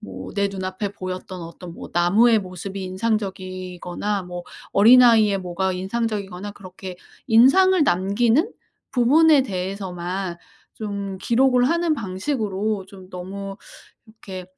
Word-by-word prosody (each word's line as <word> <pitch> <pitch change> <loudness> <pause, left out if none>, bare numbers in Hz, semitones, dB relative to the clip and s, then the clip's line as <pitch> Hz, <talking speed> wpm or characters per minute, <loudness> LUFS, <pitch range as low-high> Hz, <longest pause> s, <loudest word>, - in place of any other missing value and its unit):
뭐 95 -1 -8
내 200 -1 +1
눈앞에 190 +1 -4
보였던 185 -1 -6
어떤 170 +1 -9
뭐 - - -9
나무의 210 +7 +4
모습이 190 +1 -7
인상적이거나 185 -1 -3
뭐 175 0 -7 0.3
어린아이의 225 -2 +6
뭐가 185 +1 -2
인상적이거나 200 0 -3
그렇게 185 -1 -9 0.3
인상을 305 +11 +5
남기는 230 - +2 0.4
부분에 285 +4 +5
대해서만 185 -3 -4 0.4
좀 200 -3 -5
기록을 250 +3 +3
하는 340 -1 +1
방식으로 205 -2 -2
좀 190 -2 -14
너무 195 +2 -7 0.5
이렇게 195 -4 -9
195 Hz, 285 characters per minute, -22 LUFS, 185-230 Hz, 0.5 s, 어린아이의